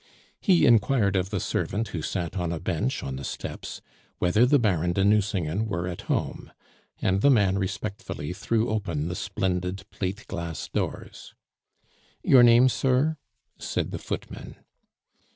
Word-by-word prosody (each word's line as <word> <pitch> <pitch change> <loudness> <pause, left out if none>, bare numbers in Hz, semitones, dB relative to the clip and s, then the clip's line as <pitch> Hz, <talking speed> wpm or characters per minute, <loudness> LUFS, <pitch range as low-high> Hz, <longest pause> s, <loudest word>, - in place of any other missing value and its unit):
He 185 -4 +4
inquired 110 -3 +4
of 95 0 0
the 100 -2 -2
servant 110 +5 -2
who 85 - -4
sat 85 +2 -3
on 90 -3 -1
a 85 - -3
bench - - -2
on 65 -1 -4
the 70 - -7
steps - - -6 0.4
whether 105 +8 +3
the 145 +2 +5
Baron 90 - +1
de 95 +2 +2
Nucingen 100 -2 +1
were 85 -4 -2
at 90 -1 -7
home; - - -2 0.5
and 95 +1 +2
the 140 - +5
man 100 -7 +3
respectfully 95 -4 -4
threw 110 +3 0
open 85 -8 -2
the 90 - -3
splendid 90 +2 -2
plate 100 +2 -4
glass 85 -4 -5
doors. - - -5 0.9
"Your 130 - +7
name, 120 +1 +7
sir?" 135 +5 +1 0.4
said - - -2
the - - -4
footman. - - -6
100 Hz, 150 wpm, -26 LUFS, 90-110 Hz, 0.9 s, Your